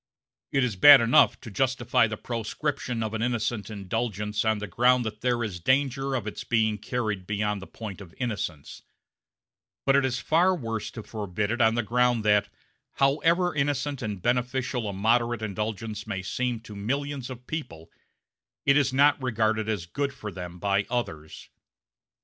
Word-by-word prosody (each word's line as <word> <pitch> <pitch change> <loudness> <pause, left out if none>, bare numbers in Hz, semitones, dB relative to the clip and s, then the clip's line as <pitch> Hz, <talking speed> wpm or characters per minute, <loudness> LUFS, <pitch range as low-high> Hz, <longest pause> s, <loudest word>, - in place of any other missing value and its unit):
It 135 -1 +2
is 120 -5 -1
bad 140 +9 +10
enough 115 0 +4
to 115 - -9
justify 120 0 +2
the 110 0 -5
proscription 120 +1 -3
of 110 0 -4
an 110 - -2
innocent 115 -3 -1
indulgence 105 0 -2
on 110 -1 +2
the 105 - -4
ground 125 +2 +3
that 105 -1 -5
there 120 -1 +1
is 95 -5 -4
danger 135 +5 +1
of 120 -5 -2
its 110 - -5
being 110 -2 +1
carried 105 -5 -3
beyond 105 -1 -1
the 95 - -9
point 105 -4 -8
of 90 -4 -11
innocence; 105 - -4 1.0
but 135 - +4
it 140 - +4
is 130 -1 0
far 170 +9 +3
worse 115 -8 -4
to 110 - -8
forbid 105 -1 -3
it 120 +1 -1
on 110 0 +4
the 120 - 0
ground 120 0 +1
that, 105 -1 +3 0.4
however 165 +6 +2
innocent 145 -1 -1
and 105 -5 -4
beneficial 125 -1 0
a - - -4
moderate 115 +3 +1
indulgence 110 +1 -4
may 95 -3 -3
seem 125 +3 -2
to 110 -2 -11
millions 135 +5 -3
of 125 -1 -9
people, 80 - -6 0.7
it 140 - +5
is 145 -2 +3
not 140 +2 +4
regarded 110 -3 0
as 100 -6 -2
good 140 +10 -2
for 105 - -7
them 90 -1 -8
by 100 +1 0
others. 80 -11 -4
115 Hz, 170 wpm, -26 LUFS, 105-130 Hz, 1.0 s, bad